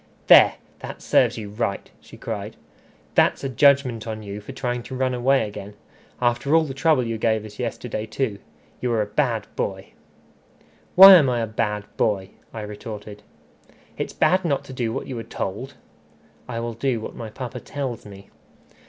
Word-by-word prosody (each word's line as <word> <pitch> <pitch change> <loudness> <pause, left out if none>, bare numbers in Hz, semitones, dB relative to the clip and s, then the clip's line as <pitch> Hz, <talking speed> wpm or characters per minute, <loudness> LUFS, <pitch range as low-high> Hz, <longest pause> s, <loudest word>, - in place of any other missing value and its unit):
"There! - - +8 0.2
that - - -8
serves - - +3
you 105 -2 -7
right," 105 -2 -3
she - - -15
cried. - - -6 0.6
"That's - - +3
a 135 - -2
judgment 130 -3 +3
on 110 -1 -5
you 100 0 -7
for 105 - -9
trying 125 -2 -3
to 130 - -8
run 130 0 0
away 125 0 +2
again. 105 0 -9 0.4
After 125 +5 +1
all 165 - +5
the 140 -4 -5
trouble 140 -1 +2
you 115 -1 -3
gave 110 -1 +1
us 105 -1 -12
yesterday 110 +1 -4
too! 110 -3 -2 0.4
You 125 - -1
are 110 -2 +2
a - - -4
bad 110 -1 -1
boy." - - -4 1.0
"Why 195 +1 +12
am 155 -8 +6
I 120 -2 0
a - - 0
bad 105 -1 -2
boy?" 95 -3 0 0.2
I 110 - -6
retorted. 105 0 -8 0.7
"It's - - -4
bad 185 +1 +2
not 145 -5 0
to 130 - -10
do 120 -3 -2
what - - -4
you 125 -3 -5
are - - -5
told." 110 +3 -5 0.7
"I 115 -2 -3
will 120 0 -4
do 120 +1 -1
what 110 - -7
my 115 -2 -7
papa 125 +2 -7
tells 130 -3 -5
me." 100 -1 -13
115 Hz, 180 wpm, -23 LUFS, 105-130 Hz, 1.0 s, Why